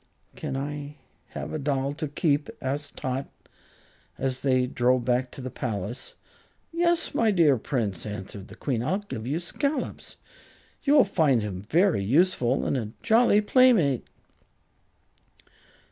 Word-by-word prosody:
"Can't 135 - -4
I 145 +1 -5 0.4
have - - -5
a 155 - -2
doll 140 -1 -1
to 155 +1 -4
keep?" 145 0 0
asked 145 +2 -4
Tot, 130 +1 -3 0.9
as 130 -1 -1
they 130 -2 +2
drove 125 0 +1
back 125 0 +1
to 135 - -9
the 130 0 -5
palace. 115 +2 -4 0.6
"Yes, 340 0 +1
my 225 - +3
dear 165 -8 +4
Prince," 110 - -2
answered 100 -1 -7
the 105 - -12
Queen. 120 -1 -2
"I'll 180 +10 0
give 160 - -7
you 145 +4 0
Scollops. 280 - -3 0.7
You 285 +1 +3
will - - +8
find 155 - +2
him 100 -1 -6
very 170 - +3
useful 135 - +2
and - - 0
a 110 -3 -4
jolly 225 -2 +5
playmate." 210 - +4
140 Hz, 140 wpm, -26 LUFS, 125-175 Hz, 0.9 s, will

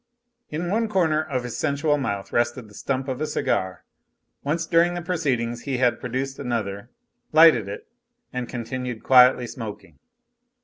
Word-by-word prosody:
In 170 +4 -3
one 225 +2 +1
corner 165 -6 +2
of 140 -6 -3
his 125 -2 -5
sensual 145 0 +1
mouth 100 -7 -3
rested 120 0 0
the 105 - -17
stump 130 +5 -3
of 130 +1 -3
a 155 - 0
cigar. 95 -10 -1 0.6
Once 165 +4 -1
during 170 +1 +3
the 175 - -3
proceedings 125 -9 -1
he 135 -3 -2
had 125 -1 +2
produced 130 +2 -4
another, 115 -4 -3 0.4
lighted 155 -10 +6
it, 100 - -7 0.5
and 125 -1 -4
continued 125 0 -5
quietly 125 -1 +6
smoking. 115 -4 -8
130 Hz, 150 wpm, -24 LUFS, 120-155 Hz, 0.6 s, lighted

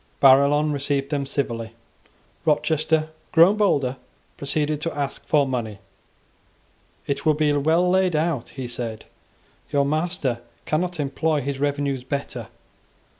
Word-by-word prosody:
Barillon 140 +3 +5
received 140 0 -1
them 140 -2 -1
civilly. 115 -5 -3 0.7
Rochester, 155 +1 +1 0.2
grown 170 +6 +6
bolder, 140 -11 +1 0.4
proceeded 150 +1 -1
to 165 -1 -3
ask 140 -1 -3
for 150 -3 +3
money. 115 -5 -3 1.3
"It 140 -1 -2
will 155 -2 +3
be 150 -1 +2
well 160 +5 +2
laid 185 -1 +2
out," 155 -5 0
he 130 -2 -6
said: 120 -2 -5 0.7
"your 140 -1 +2
master 155 -4 -1 0.3
cannot 175 +2 -1
employ 145 +2 0
his 140 0 -3
revenues 140 -2 -1
better. 130 -3 -4
145 Hz, 125 wpm, -23 LUFS, 135-155 Hz, 1.3 s, grown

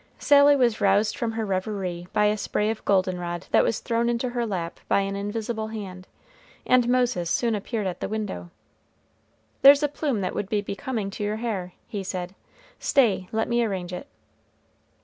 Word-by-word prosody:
Sally 285 0 +6
was 240 -5 +2
roused 205 +2 +3
from 235 -4 -2
her 220 -1 -2
revery 185 -3 -3
by 210 0 +2
a 210 0 +3
spray 210 +1 -1
of 225 - -7
goldenrod 180 -3 0
that - - +5
was 230 - 0
thrown 235 0 0
into 240 +1 -1
her 240 -1 -2
lap 175 -5 -4
by - - +3
an 195 0 -2
invisible 220 +2 -3
hand, 190 -4 -7 0.6
and 250 -1 +4
Moses 245 -9 +1
soon 235 -2 +1
appeared 210 +1 -3
at 185 -2 -3
the - - -3
window. 205 - -4 1.1
"There's 280 +2 +8
a - - +4
plume 285 -6 -2
that 185 - -2
would 195 - -3
be 210 -1 +1
becoming 210 0 -4
to 210 - -5
your 210 +1 -1
hair," 205 -6 -3
he 205 -3 -4
said; 185 -1 -4 0.5
"stay, 210 -9 +2
let 220 0 0
me 240 0 +2
arrange 185 -5 -3
it." 230 +10 -6
210 Hz, 180 wpm, -25 LUFS, 190-235 Hz, 1.1 s, There's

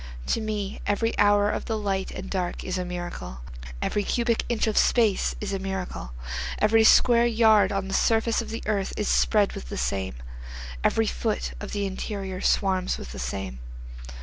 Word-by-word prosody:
To - - 0
me 210 -2 -3
every 225 +3 +1
hour 205 0 +4
of - - -3
the 225 - -1
light 195 -2 -1
and 190 - -7
dark 185 -2 -3
is 185 0 -2
a - - -1
miracle, 175 - -6 0.4
Every 205 - 0
cubic 235 +1 0
inch 235 -2 +1
of 220 -2 -1
space 220 -5 +3
is 205 -1 -3
a 195 - -1
miracle, 190 - -5 0.4
Every 220 +1 +4
square 235 +1 +6
yard 220 -4 +4
of 195 -1 -2
the 195 - -5
surface 225 +2 +2
of 230 - -8
the 225 +1 -5
earth 200 -2 -1
is 210 - -1
spread 210 -2 +3
with - - -8
the - - -5
same, 80 +7 -2 0.7
Every - - +3
foot - - -2
of - - -6
the 205 -1 -1
interior 190 -1 -4
swarms 190 -2 +1
with 60 - -8
the - - -7
same. 65 0 -4
195 Hz, 180 wpm, -26 LUFS, 180-220 Hz, 0.7 s, square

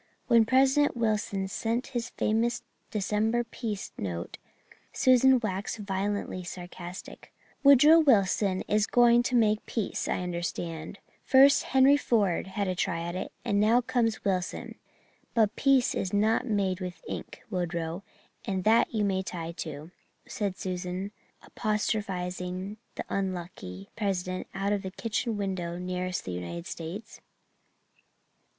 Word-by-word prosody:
When 230 -2 +5
President 265 +3 +3
Wilson 210 -4 0
sent 230 +5 -2
his 240 -1 -2
famous 230 +2 0 0.3
December 215 +3 0
peace 225 -3 -5
note 85 -3 -4 0.5
Susan 255 0 +5
waxed 200 -1 -3
violently 200 -2 -2
sarcastic. 180 0 -9 0.3
"Woodrow 290 +4 +8
Wilson 200 -8 +3
is 210 0 +2
going 240 -1 +5
to 250 +1 -1
make 215 -2 +3
peace, 225 -4 -2
I - - -1
understand. 170 -1 -4 0.3
First 275 +1 +6
Henry 270 +2 +5
Ford 205 -11 +1
had 200 +1 -2
a 185 - 0
try 170 -2 -1
at 170 +1 -4
it 185 - -4
and 200 - +1
now 220 +4 +5
comes 235 -2 0
Wilson. 185 -2 -2 0.6
But 220 -2 +3
peace 270 -2 +3
is 190 - -2
not 220 +5 +2
made 195 -4 0
with 180 -1 -6
ink, - - -7
Woodrow, 170 -1 -2 0.4
and 190 -2 -2
that 225 +3 +4
you 215 -2 0
may 190 -1 +1
tie 170 -3 -5
to," 155 -1 -7 0.4
said 200 -3 -3
Susan, 185 +1 -4 0.3
apostrophizing 190 -3 -2 0.2
the - - -5
unlucky 175 - -4
President 185 -3 -2
out 200 +1 0
of 205 - -1
the 190 - -5
kitchen 225 +2 -2
window 185 -4 -3
nearest 180 0 -3
the 90 - -4
United 90 - -5
States. 175 +6 -7
200 Hz, 130 wpm, -28 LUFS, 180-230 Hz, 0.6 s, Woodrow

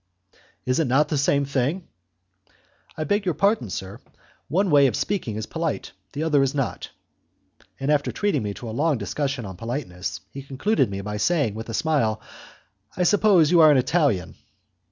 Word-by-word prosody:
"Is 130 +3 +1
it 160 - +1
not 140 +4 +3
the - - 0
same 140 0 +2
thing?" 140 +6 -1 1.1
"I 155 - -1
beg 205 +7 0
your 180 -5 -1
pardon, 200 - +1
sir, 95 +3 -6 0.5
one 185 +5 +1
way 140 -2 +6
of 125 - -1
speaking 180 - -2
is 110 0 -4
polite, 165 +2 -3 0.2
the 150 +2 -3
other 150 -3 +3
is 135 +1 0
not." 135 -3 -3 0.9
And 135 +2 0
after 145 -1 +1
treating 205 -1 0
me 105 -1 -4
to 120 - -8
a - - -5
long 145 +4 +1
dissection 135 +3 -3
on 95 -2 -8
politeness, 115 -5 -5
he 140 - -7
concluded 140 - 0 0.2
by 105 0 -3
saying, 145 -3 +1
with 110 +2 -7
a 115 - -3
smile, 115 -9 +1 0.8
"I 180 - +2
suppose 190 -5 +4
you 175 -2 +6
are 155 - +8
an 145 - +5
Italian?" 130 - +1
140 Hz, 175 wpm, -24 LUFS, 115-165 Hz, 1.1 s, are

